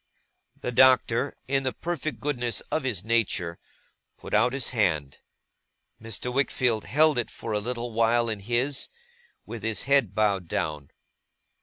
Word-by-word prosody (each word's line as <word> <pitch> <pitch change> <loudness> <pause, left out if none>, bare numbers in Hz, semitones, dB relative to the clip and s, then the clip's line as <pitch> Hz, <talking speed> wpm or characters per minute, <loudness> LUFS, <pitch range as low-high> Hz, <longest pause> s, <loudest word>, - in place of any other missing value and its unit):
The - - -3
Doctor, 130 +1 +4 0.2
in 135 0 +1
the 130 -1 -2
perfect 165 -3 -4
goodness 125 -5 -1
of 160 - +1
his 120 -9 -2
nature, 105 -7 0 0.6
put - - -10
out 125 - +4
his 135 -1 0
hand. 80 - 0 0.8
Mr. 115 +2 -4
Wickfield 125 -4 +1
held 155 -1 +3
it - - -2
for 115 - -7
a 105 - +1
little 120 +1 -4
while 115 +1 +2
in 110 -2 -2
his, 120 +7 -1 0.6
with 115 0 -7
his 110 0 0
head 135 -8 +2
bowed 100 -5 +1
down. 75 -4 -3
120 Hz, 145 wpm, -26 LUFS, 110-130 Hz, 0.8 s, Doctor